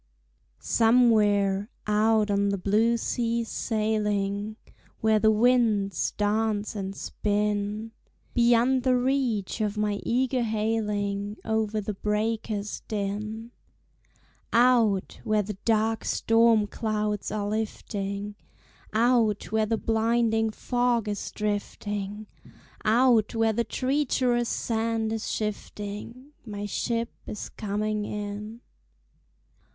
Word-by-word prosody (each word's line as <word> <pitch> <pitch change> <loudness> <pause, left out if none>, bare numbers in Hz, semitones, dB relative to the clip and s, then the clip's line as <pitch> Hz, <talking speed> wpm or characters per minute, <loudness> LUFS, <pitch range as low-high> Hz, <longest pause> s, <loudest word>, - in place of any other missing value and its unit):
Somewhere, 210 -4 +3 0.2
out 215 0 +3
on 200 0 +2
the 200 - 0
blue 215 +5 +2
seas 230 -1 -1
sailing, 210 -1 -1 0.4
Where 220 -1 +3
the 220 +1 +4
winds 220 -3 +2
dance 210 0 0
and 195 -1 -4
spin; 210 +2 -1 0.4
Beyond 240 +2 +4
the 255 0 +3
reach 245 -6 0
of 210 0 -1
my 210 -1 0
eager 255 +1 +1
hailing, 210 -2 -1
Over 220 -1 0
the 210 0 -3
breakers' 210 0 -2
din; 215 +2 -4 1.0
Out 230 -5 +3
where 215 -1 +1
the 200 -1 -7
dark 225 0 +1
storm 225 -1 +3
clouds 210 -1 -2
are 205 -1 -2
lifting, 205 -1 -3 0.6
Out 225 -3 +2
where 220 0 +2
the 225 +1 +1
blinding 225 0 +1
fog 245 0 0
is 205 -1 -3
drifting, 205 0 -3 0.6
Out 230 0 +3
where 225 0 +2
the 235 +2 +1
treacherous 255 -1 0
sand 225 -1 -1
is 225 -1 -3
shifting, 210 +4 -5
My 205 -3 -5
ship 230 +3 -1 0.2
is 210 - -6
coming 210 0 -2
in. 210 +2 -5
215 Hz, 105 wpm, -27 LUFS, 205-230 Hz, 1.0 s, the